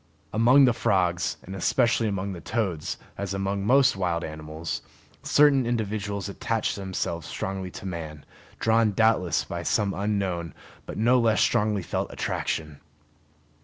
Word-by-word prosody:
Among 125 +5 +6
the 125 - +4
frogs, 90 -4 +1
and 95 - -8
especially 115 +4 +2
among 100 -1 -2
the 85 - -8
toads, 95 -7 -2 0.2
as 100 -1 -3
among 100 0 -1
most 130 +3 +4
wild 90 -3 -1
animals, 80 +1 -5 0.4
certain 140 -4 +4
individuals 105 -3 -2
attach 110 +3 -1
themselves 95 -4 -3
strongly 95 -1 -4
to 95 - -10
man, 80 -5 -6 0.3
drawn 110 -1 +3
doubtless 95 -8 +2
by 85 - -5
some 100 +3 +1
unknown 95 -5 -2 0.3
but - - -6
no 120 +3 +4
less 115 -2 +3
strongly 105 -2 +2
felt - - -3
attraction. 75 -3 -3
100 Hz, 135 wpm, -26 LUFS, 85-110 Hz, 0.4 s, Among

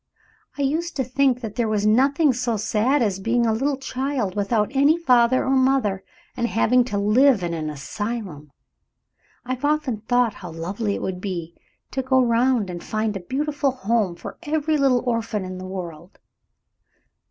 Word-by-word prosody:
I 285 - -1
used 320 +5 -1
to 270 - 0
think 255 0 +1
that 220 -2 -7
there 235 -2 +1
was 210 -1 0
nothing 275 +6 +3
so 240 -2 -1
sad 230 +6 +1
as 195 -3 -1
being 235 +4 +1
a 225 - +2
little 270 +5 0
child 265 -6 -3
without 210 +4 0
any 285 +4 +4
father 255 -5 +3
or 265 - 0
mother, 260 -7 +2 0.3
and 235 - 0
having 245 +2 +3
to 210 -5 -3
live 215 +2 +4
in 170 -1 -2
an 155 -2 -3
asylum. 180 -1 -5 0.9
I've 255 +1 -4
often 295 -5 0
thought 245 -2 +2
how 180 - -9
lovely 195 +6 -3
it - - -5
would 180 -1 -4
be 170 -4 -5 0.4
to 270 - -1
go 260 0 +2
around 235 -4 +2
and 175 -1 -7
find 215 -1 -2
a - - -3
beautiful 285 +8 -1
home 230 -7 0
for 170 - -9
every 310 -1 0
little 270 -4 +2
orphan 225 -4 -1
in 185 0 -6
the 185 - -7
world. 175 -2 -8
235 Hz, 175 wpm, -23 LUFS, 200-265 Hz, 0.9 s, any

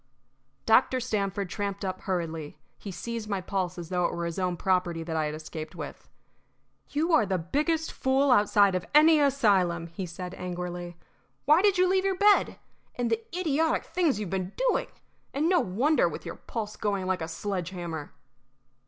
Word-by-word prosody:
Dr. 250 +3 +4
Stamford 200 -5 -2
tramped 200 -1 -3
up 185 0 -4
hurriedly. 165 -5 -3 0.2
He 205 - -7
seized 220 +4 -5
my 200 -2 0
pulse 185 -1 -2
as 170 -2 -7
though 180 -1 +1
it - - -1
were 170 - -3
his 170 +2 -4
own 180 -2 -1
property 180 -2 0
that 165 0 -4
I 155 -1 +1
had 150 0 -3
escaped 155 +1 -7
with. 155 -4 -8 0.8
"You 320 +4 0
are 315 - +6
the 190 -2 0
biggest 305 - -1
fool 265 +1 +2
outside 205 -3 +5
of 185 -1 -1
any 310 +1 +7
asylum!" 200 - +2
he 175 +3 -6
said, 180 +1 -7
angrily. 175 -1 -5 0.5
"Why 305 +4 +6
did 400 -2 +3
you 365 0 +4
leave 380 +1 +2
your 385 -1 +1
bed? 410 +1 +4 0.4
And 240 -2 -1
the 225 0 +1 0.2
idiotic 320 -1 +1
things 330 - +1
you've 205 -5 -4
been 190 0 -3 0.2
doing! - - 0 0.5
and 300 +4 +1
no 360 0 +4
wonder, 255 +12 +2
with - - -8
your - - -6
pulse 215 -3 -5
going 200 -3 -1
like 185 -1 -1
a 160 - -3
sledge 180 +1 -3
hammer." 170 -5 -6
195 Hz, 180 wpm, -28 LUFS, 175-270 Hz, 0.8 s, any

